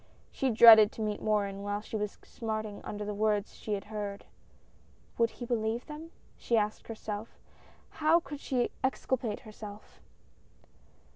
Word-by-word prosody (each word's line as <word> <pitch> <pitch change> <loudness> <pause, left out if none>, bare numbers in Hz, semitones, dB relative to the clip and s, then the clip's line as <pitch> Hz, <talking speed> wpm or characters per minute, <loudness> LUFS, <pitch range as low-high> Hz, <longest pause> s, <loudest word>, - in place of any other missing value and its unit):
She 265 - 0
dreaded 220 -2 +9
to - - -7
meet 210 -1 -2
Morin 200 -2 0
while 205 0 -2
she 220 - -8
was 210 -1 -3
smarting 215 -2 -4
under 210 0 -5
the 210 - -3
words 210 0 0
she 215 - -5
had 195 - -5
heard. 205 -2 -5 0.9
"Would 230 0 +4
he 240 - -8
believe 230 0 -1
them?" 310 +2 -8 0.3
she 235 - +1
asked 210 0 -1
herself. 215 -1 -6 0.6
How 315 +3 +5
could 290 -2 -8
she 250 -4 0
exculpate 260 -4 -1
herself? 210 -1 -11
215 Hz, 145 wpm, -30 LUFS, 210-235 Hz, 0.9 s, dreaded